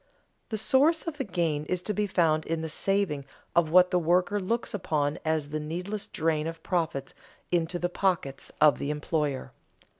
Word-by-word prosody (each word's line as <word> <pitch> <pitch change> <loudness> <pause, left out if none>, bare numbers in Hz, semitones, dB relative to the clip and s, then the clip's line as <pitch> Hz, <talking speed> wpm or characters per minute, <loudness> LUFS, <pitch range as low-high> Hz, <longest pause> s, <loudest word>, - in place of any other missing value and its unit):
The 220 - -2
source 285 +9 +3
of 315 -3 -5
the - - +1
gain 170 - -1
is 180 +2 -2
to 210 - -1
be 210 +1 0
found 160 -4 +2
in 165 0 -1
the 160 - -4
saving 195 -4 0 0.3
of 170 -2 +4
what 180 +2 +6
the 180 - +3
worker 180 +4 +2
looks 230 +5 -2
upon 150 -7 -1
as 155 -2 0
the 155 +1 -2
needless 180 +7 -4
drain 155 -1 0
of 165 0 -7
profits 160 -7 -1 0.4
into 175 0 +1
the 175 - 0
pockets 175 -7 -1
of 150 -2 +5
the 140 - -2
employer. 150 -2 -2
170 Hz, 180 wpm, -28 LUFS, 155-190 Hz, 0.4 s, what